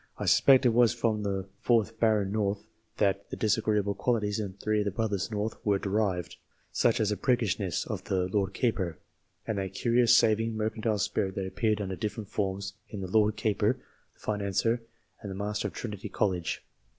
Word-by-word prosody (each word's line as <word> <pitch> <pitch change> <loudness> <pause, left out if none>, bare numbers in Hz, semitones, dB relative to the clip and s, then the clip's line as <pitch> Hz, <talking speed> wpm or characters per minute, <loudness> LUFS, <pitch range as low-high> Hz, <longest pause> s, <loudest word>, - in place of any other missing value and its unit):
I - - -3
suspect 135 -1 +6
it - - +7
was 120 0 +4
from 115 -2 0
the 100 -2 -2
fourth 115 -2 +1
Baron 105 -4 +2
North 105 -1 -1 0.3
that 100 -2 +1
the - - -4
disagreeable 105 -1 +1
qualities 105 -3 0
in 100 -3 -3
three 105 +2 -1
of 105 - 0
the - - +1
brothers 100 -1 -1
North 110 0 -3
were 100 -2 +2
derived 95 -3 -1 0.3
such 120 +1 +2
as 110 -2 +2
the 105 - -1
priggishness 100 -8 0
of - - -5
the 90 -1 0
Lord 95 0 -1
Keeper, 95 - 0 0.5
and 110 -3 -2
that 95 0 -4
curious 120 +1 +4
saving, 110 0 +3
mercantile 110 0 -1
spirit 95 -1 -1
that 95 - -2
appeared 105 +2 0
under 95 -2 -3
different 105 +1 -4
forms 100 -1 -2 0.2
in 105 - -6
the 95 -1 -5
Lord 105 0 +3
Keeper, 105 0 +1 0.4
the - - -32
Financier, 105 +3 0 0.4
and 105 - -6
the 95 - -5
Master 105 +1 -2
of - - -9
Trinity 105 -3 -5
College. 90 -5 -1
105 Hz, 185 wpm, -29 LUFS, 100-110 Hz, 0.5 s, it